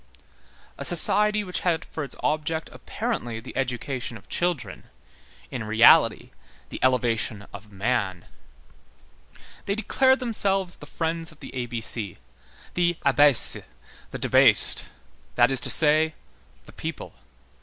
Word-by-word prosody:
A - - -4
society 210 +5 +4
which 180 -2 -4
had 165 -3 -1
for 155 - -7
its 135 - -8
object 155 +1 -2
apparently 115 -1 -5
the 120 - -12
education 125 -1 -4
of 100 - -20
children, 175 -7 -3 0.7
in 120 - -5
reality 110 +1 +4 0.4
the - - -8
elevation 115 -5 -1
of 100 +1 -12
man. 100 -3 -3 1.4
They 200 - -2
declared 260 +4 +1
themselves 195 -6 -1
the 145 - -13
Friends 165 +1 -3
of 155 - -20
the - - -11
A 125 -2 -4
B 120 -1 -5
C,—the 120 - -4
Abaissé,—the 135 - +1
debased,—that - - +2
is 135 - +4
to - - +3
say, 155 +1 +5 0.5
the - - -16
people. - - -7
140 Hz, 120 wpm, -24 LUFS, 115-170 Hz, 1.4 s, say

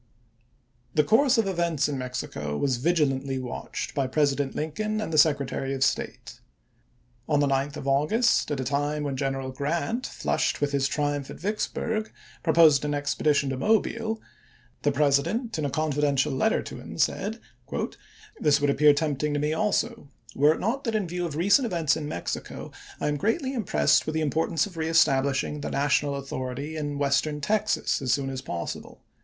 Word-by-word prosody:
The 150 - +5
course 255 - +4
of 225 - +3
events 170 -6 0
in 145 - -2
Mexico 125 - -4
was 130 -3 +1
vigilantly 140 -3 +1
MAXIMILIAN 130 - -3
401 - - -5
watched - - -4
by 135 -2 0
President 140 0 +1
Lincoln 215 +8 -2
and 215 -7 -4
the - - +1
Secretary 140 -2 +2
of 135 - -6
chap. 135 - +6
xiv. - - +1
State. - - -8 0.9
On 150 -2 +3
the 145 - +3
9th 140 +1 0
of 135 - -6
August, 150 - +2
at 145 -3 -2
a - - -1
time 145 +3 -1
when 140 -2 -2
Gen 135 0 -1
eral 130 -1 -5
Grant, 170 - -2
flushed - - -1
with 145 -1 0
his 140 -1 +1
triumph 145 -2 -1
at - - -9
Vicksburg, 215 +2 -2 0.3
proposed 160 -4 +5
an 145 0 -1
expedition 145 -1 +1
to 130 - -3
Mobile, 220 - +1 0.6
the 145 - +2
President 150 - +1
in 150 - -1
a - - 0
confidential 145 -1 +1
letter 130 - +1
to - - -8
him - - -9
said: - - 0 0.5
" - - -22
This 150 -1 +3
would 145 0 +2
appear 150 +1 +5
tempting 150 -1 -1
to - - +1
me 150 +1 0
also, 215 0 -1 0.2
were 150 +3 +4
it - - -8
not 250 +7 -1
that 225 -2 -1
in 205 -4 0
view 175 +1 -2
of 150 - -6
recent 200 - +4
events 165 -7 +1
in 150 -2 -4
Mexico - - -5 0.3
I - - -1
am 150 0 0
greatly 260 - 0
im 230 -6 -2
pressed - - +3
with 155 - -2
the 160 - +1
importance 160 0 +1
of 185 -4 -11
reestablishing 145 -3 +2
the - - -3
national 140 0 +1
authority 135 +2 -5
in 145 -2 -3
Western 145 +1 +1
Texas 215 +4 0
as 130 -2 0
soon 135 0 0
as 130 -1 -5
possible. 85 -1 -6
145 Hz, 190 wpm, -26 LUFS, 140-170 Hz, 0.9 s, chap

